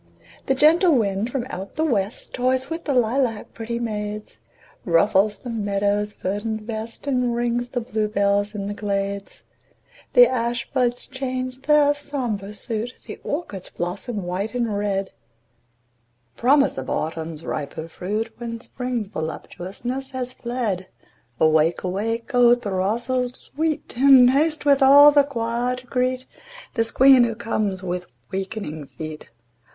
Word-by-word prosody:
The 270 - +2
gentle 320 +4 +5
wind 205 -1 0
from 250 -1 -2
out 190 +2 -6
the 315 - 0
west 210 -6 -1
Toys 260 +2 0
with 330 +1 -4
the 285 - 0
lilac 240 -2 0
pretty 230 +1 -4
maids; 210 -2 -5 0.4
Ruffles 200 +4 +3
the 245 - -7
meadow's 205 -1 0
verdant 210 +3 -3
vest, 225 +2 -6
And 250 -4 +1
rings 240 0 -1
the 245 - -2
bluebells 210 -2 0
in 200 -1 -3
the 205 - -3
glades; 200 -1 -3 0.7
The - - +8
ash 235 -1 -1
buds 245 -2 +1
change 255 -1 -4
their 295 0 +4
sombre 250 -9 -4
suit, 230 +2 -4
The - - -8
orchards 285 - -4
blossom 190 +5 -4
white 190 +6 -3
and 235 -4 0
red— 195 -1 -1 1.2
Promise 275 - +3
of 130 - -6
Autumn's 160 0 -3
riper 155 +2 -4
fruit, 205 +7 -4
When 230 -1 -5
Spring's 245 -2 -4
voluptuousness 195 +10 -5
has 255 -1 -3
fled. 235 -8 -3 0.5
Awake! 160 +1 +3
awake, 225 +7 -2
O 245 -1 +6
throstle 235 +4 -1
sweet! 310 +5 -3
And 260 -1 +7
haste 305 +2 +1
with 280 -1 +4
all 285 +2 +9
your 285 -1 +5
choir 240 -1 -1
to 255 0 -10
greet 255 +1 -1 0.5
This 225 0 +1
Queen 265 0 +7
who 230 -1 0
comes 210 -4 -2
with 180 -1 -3 0.2
wakening 190 -6 -4
feet. 155 +1 -8
230 Hz, 135 wpm, -23 LUFS, 200-255 Hz, 1.2 s, all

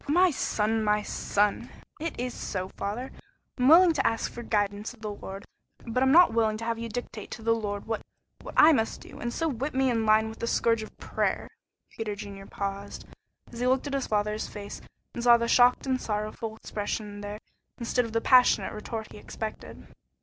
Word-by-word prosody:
"My 355 +5 +4
son, 220 -4 0
my 210 0 +2
son!" 205 0 0 0.3
"It's 255 -6 -3
so, 185 -1 -4
father. 225 +8 -4 0.5
I'm 250 - +3
willing 335 +3 +8
to 275 - +2
ask 225 0 -1
for 240 - -7
guidance 205 0 -1
of 225 - -26
the 215 -1 -4
Lord, 195 -1 -8 0.4
but 235 +2 -1
I'm 265 0 +4
not 345 -1 +7
willing 220 -2 +2
to 225 - -6
have 230 0 -1
you 230 0 -4
dictate 225 -2 -6
to 225 - -8
the 230 +1 +3
Lord 205 -3 -3
what 225 -1 -2 0.4
what - - -9
I 315 +1 +8
must 225 -5 0
do, - - -12
and 240 - -3
so 325 +6 -1
whip 275 0 -3
me 265 -1 +3
in 225 -2 +1
line 215 +1 +5
with 220 0 -9
the 230 - -2
scourge 230 -1 +2
of 215 - -10
prayer." - - -1 0.4
Peter 215 -2 -4
Junior 195 -1 -9
paused, 200 0 -5 0.5
as 235 - -7
he 250 - +1
looked 260 +2 +2
in 285 - -4
his 275 -2 -1
father's 210 0 0
face 205 -1 -8 0.3
and 235 - -5
saw 240 -1 +7
the 235 0 -1
shocked 245 +2 +5
and 260 -1 0
sorrowful 215 +1 -3
expression 205 -1 -5
there 205 0 -5 0.4
instead 245 +1 0
of 230 - -6
the 230 0 0
passionate 250 0 +5
retort 220 +1 -6
he - - -10
expected. 220 +1 -7
225 Hz, 200 wpm, -28 LUFS, 210-250 Hz, 0.5 s, willing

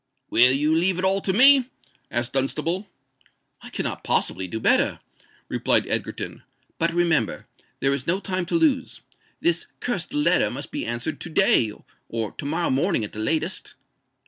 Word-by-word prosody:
"Will 125 +2 +6
you 150 +4 +2
leave 175 +3 +2
it 185 - -1
all 195 +1 +2
to 190 - 0
me?" 260 +4 +6 0.4
asked 120 +1 -1
Dunstable. 160 +8 0 0.7
"I - - -10
cannot - - -4
possibly 95 +1 0
do 110 +5 -4
better," - - +2 0.5
replied - - +1
Egerton. - - -3 0.4
"But 165 +1 +2
remember—there 165 -4 -1
is 140 -2 -4
no 180 +3 +2
time 185 -3 -3
to - - -1
lose. 310 -5 +1 0.4
This 170 0 +1
cursed 240 -4 -2
letter 295 +1 +2
must - - -7
be 290 - -4
answered 120 +6 -3
to - - -7
day, 155 - +3 0.4
or 115 -3 -3
to - - -8
morrow 165 +4 -1
morning 140 - +1
at 105 - -6
latest." 110 +9 -2
165 Hz, 155 wpm, -24 LUFS, 130-190 Hz, 0.7 s, Will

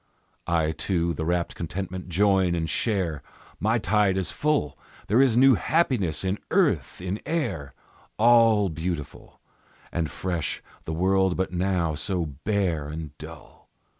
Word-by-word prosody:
I, 80 -3 +1
too, 85 0 -1
the 80 +1 -4
rapt 85 0 0
contentment 90 +2 -5
join 95 -1 +3
and 80 -1 -1
share; 90 - -1 0.4
My 110 +3 +2
tide 105 -2 +2
is 95 - -1
full; 150 - 0 0.3
There 115 +6 +3
is 125 -4 +3
new 135 +1 +7
happiness 120 - +1
in 95 +2 -1
earth, - - +1
in 95 +3 -3
air: 100 - -3 0.4
All 115 -3 +5
beautiful 80 -1 -5 0.5
And 85 -3 -1
fresh 90 -4 -3 0.2
the - - -4
world 95 +2 +2
but 95 0 -1
now 90 -3 0
so 90 +3 -1
bare 80 +1 -1
and 75 -1 -7
dull. 80 +1 -12
90 Hz, 135 wpm, -25 LUFS, 80-105 Hz, 0.5 s, new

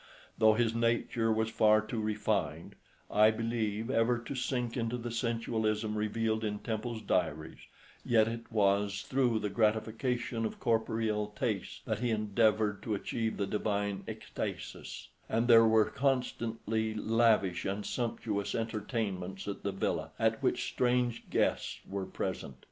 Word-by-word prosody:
Though 110 -1 +5
his 115 0 +2
nature 115 -1 +1
was 110 0 +1
far 110 -1 +5
too 110 +1 -3
refined, 105 -7 -1 0.4
I 105 +1 +6
believe, 115 0 -1
ever 120 0 +3
to 120 +3 -6
sink 125 -2 -2
into 120 -1 -1
the 120 0 -5
sensualism 115 -2 -1
revealed 110 +1 0
in 105 -1 -1
Temple's 110 +1 -4
diaries, 80 +2 -1 0.4
yet 110 -2 +4
it 115 +1 -5
was 100 -1 +2
through 125 -4 +2
the 105 -2 -2
gratification 115 +2 0
of 110 - -3
corporeal 110 -2 0
tastes 110 -7 -2
that 110 -3 -1
he 120 0 0
endeavoured 110 -1 +2
to 110 - -1
achieve 110 +2 -2
the 100 - 0
divine 100 0 -1
extasis; - - -6 0.2
and 115 +2 +1
there 115 -2 +8
were 110 -1 +5
constantly 115 -4 -1
lavish 110 -5 +2
and 100 +1 -2
sumptuous 110 -4 -2
entertainments 105 -4 -3
at 100 - -4
the 100 - -2
villa, 95 - -1
at - - +1
which - - +1
strange 125 -1 0
guests - - 0
were 95 -1 -4
present. - - -4
110 Hz, 140 wpm, -32 LUFS, 105-115 Hz, 0.4 s, there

